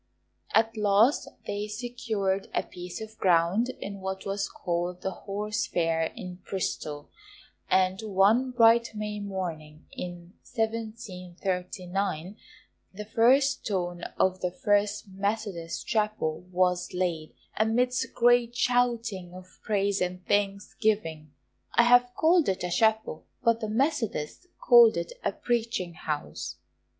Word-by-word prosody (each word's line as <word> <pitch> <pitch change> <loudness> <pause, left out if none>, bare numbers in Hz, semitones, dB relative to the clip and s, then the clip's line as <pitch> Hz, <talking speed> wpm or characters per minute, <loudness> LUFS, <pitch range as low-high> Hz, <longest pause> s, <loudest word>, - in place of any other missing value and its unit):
At 225 +1 +3
last 210 +5 +3 0.2
they 205 +1 -3
secured 215 -4 -2
a - - +1
piece 180 +2 -8
of 220 0 -9
ground 180 +6 +3
in 200 0 -6
what 190 0 -4
was 195 0 -2
called 175 +1 -3
the 190 - -1
Horse 210 +4 -3
Fair 165 -1 +1
in 180 -1 -7
Bristol, 150 -6 -4 0.6
and 185 +1 +2
one 215 +5 +3
bright 235 -2 +4
May 210 0 -4
morning, 170 -6 -5
in 175 0 -8
1739, 190 -5 -3 0.6
the 210 +2 -7
first 265 +6 +3
stone 175 -4 -2 0.2
of 185 0 +2
the 180 - 0
FIRST 205 +2 0
METHODIST 195 -3 -3
CHAPEL 210 -7 -1
was 180 0 +1
laid, 170 -4 -2 0.2
amidst 245 +4 +1
great 240 0 +4
shouting 235 -7 0
of 185 0 -13
praise 200 -2 0
and 180 0 -2
thanksgiving. 200 -5 0 0.4
I 235 - +7
have 245 +1 +5
called 330 - +4
it 190 - -1
a 180 - -2
Chapel, 220 -3 +1 0.2
but 230 -1 +3
the 220 - -3
Methodists 245 - -1
called 235 -5 +7
it 170 0 -3
a - - +1
"Preaching 230 -5 -2
House." 145 - -4
200 Hz, 120 wpm, -28 LUFS, 180-225 Hz, 0.6 s, I